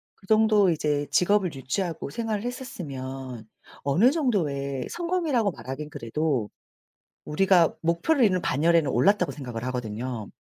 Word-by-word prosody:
그 195 - -21
정도 215 -2 +4
이제 150 -3 0
직업을 185 -2 +2
유지하고 145 +4 -3
생활을 220 +3 -3
했었으면 135 - -6 0.4
어느 175 - +4
정도의 145 - -1
성공이라고 335 - 0
말하긴 150 +1 -7
그래도 130 -2 -2 0.7
우리가 175 +1 +3
목표로 170 - +1
있는 185 -4 +3
반열에는 160 0 +2
올랐다고 180 - +3
생각을 120 -5 -6
하거든요. 120 -2 -4
160 Hz, 335 characters per minute, -26 LUFS, 135-205 Hz, 0.7 s, 정도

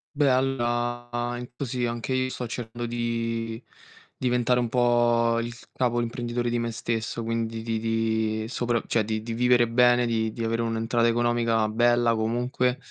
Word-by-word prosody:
Beh, 145 -2 +3
allora, 120 -2 0
in 125 - -7
così 125 -2 -2
anche 120 +2 -3
io 130 0 +1
sto 125 - -5
cercando 120 0 -5
di 115 -1 -2 0.6
diventare 125 0 +1
un 120 -2 -1
po' 120 -1 +3
il 120 +1 -3 0.2
capo, 120 -2 0
l'imprenditore 120 0 -2
di 120 - 0
me 115 0 -1
stesso, 115 0 -3
quindi 115 0 -2
di 115 -1 -1
di 110 -1 0
soprav 120 -1 -1
cioè, 115 -2 +1
di 110 0 -3
di 115 0 -4
vivere 120 0 +4
bene, 120 +1 +4
di 110 -1 0
di 115 +1 -5
avere 115 +1 0
un'entrata 115 +1 +1
economica 115 -1 +2
bella 120 +1 +3
comunque, 125 +3 0
120 Hz, 160 wpm, -26 LUFS, 115-120 Hz, 0.6 s, vivere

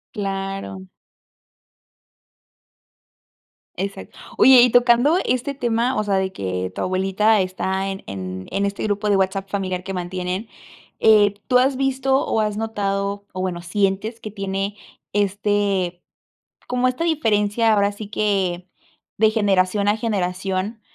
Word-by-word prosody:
Claro. 195 - -4 2.9
Exac 195 +3 -5 0.3
oye, 260 -2 +8
y 250 - +6
tocando 245 +6 +4
este 255 +3 -1
tema, 240 -1 0
o 215 - +1
sea, 200 -2 0
de 190 0 0
que 95 - -3
tu - - -5
abuelita 195 +3 +2
está 190 +1 -2
en 195 0 -6
en 95 -1 -6
en 200 +1 0
este 200 0 -3
grupo 210 0 -1
de 200 - +4
WhatsApp 195 +1 -1
familiar 185 -2 -3
que 195 - -5
mantienen, 180 +3 -4 0.5
eh 210 -2 +5
¿tú 250 - +4
has 265 +2 +2
visto 270 0 +1
o - - 0
has 210 -1 -1
notado 200 -2 -2
o 185 - -4
bueno, 180 -2 -3
sientes 195 +5 -1
que 215 - -8
tiene 195 0 -3 0.4
este, 200 -3 0 0.7
como 250 0 +1
esta 255 +6 -1
diferencia, 225 -8 +2
ahora 200 -1 +2
sí 205 0 -9
que 190 -4 -1 0.5
de 220 +1 +5
generación 200 -2 +1
a 205 - +3
generación, 195 0 -2
200 Hz, 135 wpm, -21 LUFS, 190-220 Hz, 2.9 s, oye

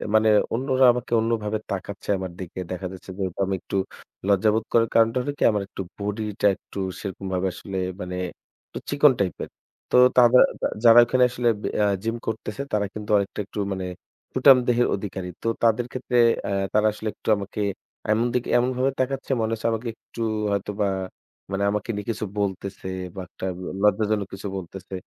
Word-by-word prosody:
মানে 110 0 +5 0.2
অন্যরা 130 +1 +3
আমাকে 120 -1 -5
অন্যভাবে 110 -2 0
তাকাচ্ছে 100 +1 -5
আমার 95 -1 -5
দিকে। 95 0 -7
দেখা 90 0 -3
যাচ্ছে 95 - -12
যেহেতু 95 -1 -3
আমি 95 0 -1
একটু - - -6 0.5
লজ্জাবোধ 105 +2 +3
করার 115 -1 +4
কারণটা 115 +2 +4
হলো 145 - -2
কি - - +1
আমার 105 -1 0
একটু 95 - -7 0.2
body 105 +2 -3 0.2
টা - - +2
একটু - - -14 0.2
সেরকমভাবে 95 -1 -3
আসলে 95 +1 -6 0.2
মানে 90 0 -4 0.5
একটু - - -7
চিকন 145 0 +5
type 95 -3 0
এর। - - -7 0.4
তো - - +2 0.2
তাদা 125 0 +7 0.2
যা - - +2 0.2
যারা 115 0 +9
ওখানে 125 +1 +3
আসলে 125 0 -1 0.2
ব্যা - - -1
এ্যা 105 -1 +3 0.2
gym 115 +1 -1
করতেছে 110 +3 -4
তারা 105 -1 +2
কিন্তু 105 0 -7
অনেকটা 100 +1 -2
একটু 105 - -7
মানে 95 -1 -3 0.5
সুঠাম 130 0 +7
দেহের 120 0 +3
অধিকারী। 95 -2 -5 0.2
তো - - -1 0.2
তাদের 115 +1 +3
ক্ষেত্রে 125 -1 -2 0.3
এ্যা - - -2 0.2
তারা 105 0 +4
আসলে 110 +1 -6
একটু - - -6
আমাকে 100 +1 -6 0.5
এমন 115 +2 +2
দিকে, 125 -1 0
এমনভাবে 130 +2 +1
তাকাচ্ছে 135 +1 -1
মনে 110 0 0
হচ্ছে 115 +1 -2
আমাকে 115 +2 -3
একটু 115 - -10 0.3
হয়তোবা 100 +1 -1 0.6
মানে 100 +1 -1
আমাকে 105 +2 -3
নিয়ে 105 - -5
কিছু 110 -1 -2
বলতেছে 95 -1 -3 0.3
বা 95 - -5
একটা 95 - -8
ব - - -8 0.2
লজ্জাজনক 105 -1 +2
কিছু 95 +1 -6
বলতেছে। 95 +1 -9
105 Hz, 180 wpm, -24 LUFS, 100-120 Hz, 0.6 s, যারা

